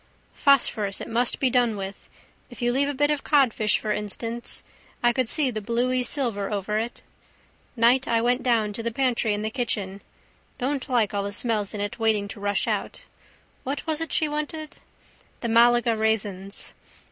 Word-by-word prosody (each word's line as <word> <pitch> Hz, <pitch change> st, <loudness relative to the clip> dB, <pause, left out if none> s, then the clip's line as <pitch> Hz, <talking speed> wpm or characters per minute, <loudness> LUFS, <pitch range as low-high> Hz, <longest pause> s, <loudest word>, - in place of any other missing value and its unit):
Phosphorus 225 Hz, -8 st, +2 dB
it -, -, -6 dB
must 235 Hz, +2 st, +2 dB
be 260 Hz, -2 st, +2 dB
done 240 Hz, -4 st, +2 dB
with. 195 Hz, 0 st, -7 dB, 0.4 s
If 245 Hz, -, -12 dB
you 240 Hz, 0 st, +1 dB
leave 280 Hz, +2 st, +1 dB
a -, -, -2 dB
bit 290 Hz, +2 st, +2 dB
of 295 Hz, -2 st, -1 dB
codfish 250 Hz, -7 st, +3 dB
for 215 Hz, -, -3 dB
instance. 225 Hz, +3 st, -2 dB, 0.4 s
I 240 Hz, 0 st, +4 dB
could 255 Hz, -2 st, 0 dB
see 285 Hz, -5 st, +3 dB
the 215 Hz, -2 st, -4 dB
bluey 245 Hz, +4 st, 0 dB
silver 235 Hz, -6 st, 0 dB
over 210 Hz, +1 st, -1 dB
it. 235 Hz, +2 st, -5 dB, 0.7 s
Night 245 Hz, +3 st, +4 dB
I 230 Hz, -1 st, +2 dB
went 245 Hz, +2 st, +1 dB
down 225 Hz, -4 st, +1 dB
to 230 Hz, -, -4 dB
the 235 Hz, -, -1 dB
pantry 235 Hz, -3 st, 0 dB
in 205 Hz, -, -4 dB
the 220 Hz, -, -2 dB
kitchen. 205 Hz, -5 st, -2 dB, 0.6 s
Don't 275 Hz, +2 st, -2 dB
like 235 Hz, -5 st, +2 dB
all 200 Hz, -, 0 dB
the 200 Hz, 0 st, -4 dB
smells 215 Hz, -1 st, 0 dB
in 205 Hz, -, -3 dB
it 205 Hz, +3 st, -4 dB
waiting 220 Hz, -2 st, +2 dB
to 205 Hz, -, -8 dB
rush 205 Hz, 0 st, 0 dB
out. -, -, -2 dB, 0.6 s
What 275 Hz, +2 st, -4 dB
was 315 Hz, -1 st, -1 dB
it 325 Hz, -, -3 dB
she 310 Hz, -, +2 dB
wanted? 300 Hz, +1 st, -5 dB, 0.6 s
The 235 Hz, -, -2 dB
Malaga 235 Hz, 0 st, +4 dB
raisins. 205 Hz, -3 st, -1 dB
235 Hz, 180 wpm, -25 LUFS, 210-255 Hz, 0.7 s, I